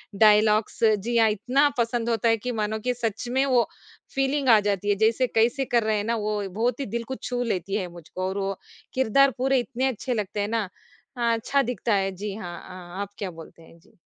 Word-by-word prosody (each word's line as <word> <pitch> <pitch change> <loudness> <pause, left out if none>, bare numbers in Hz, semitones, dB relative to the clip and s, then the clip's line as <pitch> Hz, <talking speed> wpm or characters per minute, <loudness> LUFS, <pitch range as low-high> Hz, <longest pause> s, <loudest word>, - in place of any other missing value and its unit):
Dialogues 215 +1 +4
जी 220 +2 +2
हाँ, 225 -1 +5
इतना 250 +7 +2
पसंद 235 0 0
होता 230 0 +2
है 225 - +3
कि 250 +4 -4
मानो 215 +1 -1
कि 250 +3 -1
सच 230 -1 -3
में 265 +2 +2
वो 250 -3 +3 0.5
फ़ीलिंग 270 0 +1
आ 220 -2 +8
जाती 205 0 -1
है। 205 - +4
जैसे 225 +4 +2
कैसे 240 +5 +1
कर 235 -2 +2
रहे 215 -1 +1
हैं 205 - -1
ना 230 +2 0
वो 210 -1 -1
बहुत 230 +6 -1
ही 275 - -2
दिल 235 +3 -3
को 265 +3 -5
छू 245 -1 -2
लेती 195 -3 -2
है 190 -4 -1
मुझको, 175 +1 -9
और 190 +1 -3
वो 195 -1 -2 0.4
किरदार 265 +2 +4
पूरे 265 +1 +2
इतने 260 +1 -1
अच्छे 255 0 -2
लगते 210 -1 -3
हैं 205 - -1
ना, 220 -4 -1 0.5
हाँ 235 -1 +2
अच्छा 275 +5 +1
दिखता 245 -3 -1
है 195 -1 +1
जी 205 +1 -5
हाँ, 175 -5 -7
अ, 185 +1 -9
आप 200 - -4
क्या 195 -3 -4
बोलते 165 0 -13
हैं, 165 +1 -18
जी? 215 +5 -26
220 Hz, 225 wpm, -25 LUFS, 205-245 Hz, 0.5 s, आ